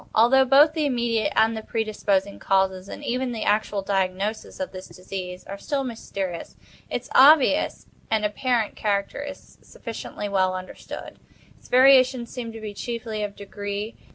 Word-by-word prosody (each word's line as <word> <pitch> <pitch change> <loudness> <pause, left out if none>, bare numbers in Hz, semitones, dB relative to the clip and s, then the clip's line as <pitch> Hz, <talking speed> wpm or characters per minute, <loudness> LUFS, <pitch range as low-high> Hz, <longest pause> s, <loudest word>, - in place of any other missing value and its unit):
Although 260 +4 +5
both 285 +4 +6
the 310 -2 0
immediate 235 -4 0
and 225 +1 +3
the 220 - -4
predisposing 205 -3 -1
causes, 190 0 +1
and - - -8
even 250 0 -1
the 225 - -3
actual 205 -1 +1
diagnosis, 195 +4 -2
of 280 - -3
this 185 0 -9
disease 180 -1 -7
are 200 0 -8
still 280 +4 -2
mysterious, 195 -7 -5 0.3
its - - -4
obvious 290 +2 +5 0.2
and 220 -1 +1
apparent 230 +1 0
character 200 +4 -1
is 285 -1 -10
sufficiently 225 -2 -7
well 190 -2 +1
understood. 185 0 -8 0.4
Its - - -20
variations 255 -2 +5
seem 235 -2 -5
to 225 - -9
be 215 -1 -6
chiefly 225 0 -4
of 205 -1 -4
degree. 205 +2 -5
220 Hz, 155 wpm, -24 LUFS, 200-250 Hz, 0.4 s, both